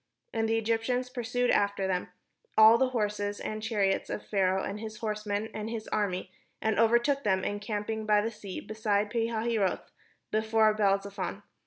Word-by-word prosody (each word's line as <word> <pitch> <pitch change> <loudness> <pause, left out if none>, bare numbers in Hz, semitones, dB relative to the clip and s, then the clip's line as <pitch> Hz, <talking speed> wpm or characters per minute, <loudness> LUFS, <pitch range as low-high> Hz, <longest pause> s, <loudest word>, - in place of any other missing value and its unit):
But 225 -1 0
the 225 0 +2
Egyptians 230 +3 0
pursued 245 0 0
after 200 -1 +1
them, 185 -1 -1 0.5
all 220 +1 +8
the 265 - +3
horses 205 -3 -1
and 215 0 -4
chariots 205 -3 0
of - - -4
Pharaoh, 190 -2 +1
and 200 - -4
his 215 0 -7
horsemen, 210 -1 -2
and 215 +1 -4
his 225 -1 -5
army, 185 -3 -1 0.3
and 220 -1 0
overtook 235 +5 +3
them 190 -2 +1
encamping 210 +1 -3
by 210 -1 +5
the 225 +2 -2
sea, 200 -4 -7
beside 210 -1 -1
Pi 230 -1 +1
hahiroth, 225 -4 -1 0.4
before 220 0 +3
Baal 200 -2 +3
zephon. 200 +1 -5
215 Hz, 165 wpm, -29 LUFS, 205-225 Hz, 0.5 s, all